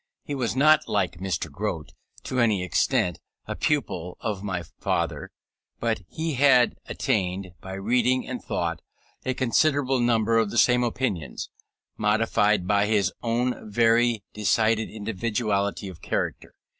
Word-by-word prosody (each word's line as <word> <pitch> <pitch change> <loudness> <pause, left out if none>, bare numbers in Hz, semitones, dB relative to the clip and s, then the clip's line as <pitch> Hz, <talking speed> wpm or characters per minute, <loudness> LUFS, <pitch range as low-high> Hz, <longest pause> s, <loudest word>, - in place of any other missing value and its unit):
He 145 - -5
was 125 -4 -1
not, 155 +3 +5
like 90 -4 0
Mr. 90 -5 -3
Grote, 85 -2 -4 0.3
to 130 - -2
any 110 -6 +2
extent, 90 +1 +1 0.3
a - - -4
pupil 90 - -1
of 100 -3 -3
my 95 -4 -3
father, - - -3 0.5
but 115 -4 -1
he 160 0 -3
had 130 -3 +5
attained, 95 -6 -1
by 95 - -7
reading 125 +6 +1
and 125 -1 -5
thought, 85 -1 -2 0.4
a 130 - -1
considerable 135 +1 +2
number 115 -1 +3
of 110 -2 +1
the 120 - -4
same 125 0 +5
opinions, 115 - -3 0.5
modified 105 -2 +2
by 100 +1 +2
his 100 -3 +2
own 120 -1 -1
very 115 0 +3
decided 110 +1 +1
individuality 105 -1 -2
of 90 -3 -10
character. - - -3
110 Hz, 135 wpm, -25 LUFS, 95-125 Hz, 0.5 s, not